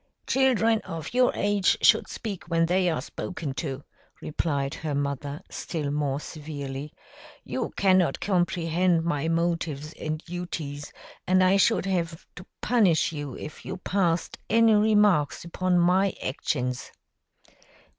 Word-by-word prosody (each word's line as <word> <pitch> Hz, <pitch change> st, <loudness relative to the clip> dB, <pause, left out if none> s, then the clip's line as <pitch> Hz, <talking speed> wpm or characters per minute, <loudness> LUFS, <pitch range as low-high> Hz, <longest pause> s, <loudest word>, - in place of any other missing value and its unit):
"Children 230 Hz, -4 st, +3 dB
of 165 Hz, +2 st, -7 dB
your 250 Hz, 0 st, +4 dB
age 205 Hz, -1 st, +2 dB
should -, -, +5 dB
speak 205 Hz, -6 st, -6 dB
when 165 Hz, -1 st, +2 dB
they 180 Hz, +1 st, +2 dB
are 155 Hz, -6 st, -1 dB
spoken 155 Hz, -2 st, -5 dB
to," 135 Hz, -2 st, -4 dB, 0.4 s
replied 140 Hz, -3 st, -2 dB
her 155 Hz, -3 st, -3 dB
mother, 140 Hz, +2 st, -3 dB
still 150 Hz, -4 st, -3 dB
more 145 Hz, -2 st, -1 dB
severely. 145 Hz, -2 st, -6 dB, 0.5 s
"You -, -, -3 dB
cannot 185 Hz, -6 st, +3 dB
comprehend 175 Hz, -2 st, +1 dB
my 160 Hz, -2 st, 0 dB
motives 165 Hz, -3 st, -1 dB
and 155 Hz, 0 st, -3 dB
duties, 160 Hz, -4 st, -6 dB, 0.4 s
and 185 Hz, 0 st, +4 dB
I 185 Hz, +2 st, +5 dB
should 225 Hz, +2 st, +3 dB
have 170 Hz, -3 st, -2 dB
to 180 Hz, -, -11 dB, 0.2 s
punish 200 Hz, -12 st, +3 dB
you 145 Hz, -4 st, -6 dB
if 155 Hz, -, -9 dB
you 190 Hz, -, -5 dB
passed 180 Hz, -3 st, 0 dB
any 225 Hz, 0 st, +5 dB
remarks 210 Hz, -8 st, +3 dB
upon 180 Hz, +1 st, 0 dB
my 185 Hz, +2 st, +3 dB
actions." 125 Hz, -1 st, -2 dB
170 Hz, 130 wpm, -26 LUFS, 145-185 Hz, 0.5 s, should